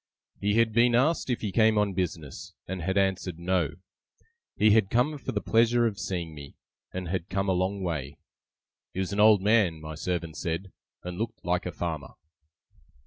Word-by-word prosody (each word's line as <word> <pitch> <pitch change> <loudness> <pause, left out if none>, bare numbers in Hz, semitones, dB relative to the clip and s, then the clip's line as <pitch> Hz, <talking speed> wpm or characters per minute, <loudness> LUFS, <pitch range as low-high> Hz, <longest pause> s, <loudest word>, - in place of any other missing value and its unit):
He 105 +1 +1
had 115 -1 +3
been 120 +1 +4
asked 135 +4 +2
if 125 - -1
he 105 - -2
came 110 +2 +4
on 105 -2 +2
business, 85 -6 -4
and 95 -1 -4
had 95 +3 -1
answered 95 -3 0
No; 85 -3 0 0.8
he 105 0 +4
had 105 -2 +4
come 135 +7 +1
for - - -4
the 105 - -2
pleasure 120 +1 +3
of 105 -4 -1
seeing 85 -4 -3
me, 70 -2 -11 0.4
and 90 -2 -5
had 90 -1 -3
come 95 +1 -1
a - - +3
long 95 +2 -1
way. 75 -5 -3 0.8
He - - -2
was 95 +1 -2
an 100 - -2
old 105 -2 +6
man, 105 -7 +3
my 80 0 -7
servant 85 0 -3
said, 85 +3 -3 0.3
and 90 +1 -6
looked 115 0 -4
like 90 +1 0
a - - -3
farmer. 80 -4 -5
95 Hz, 190 wpm, -27 LUFS, 85-110 Hz, 0.8 s, old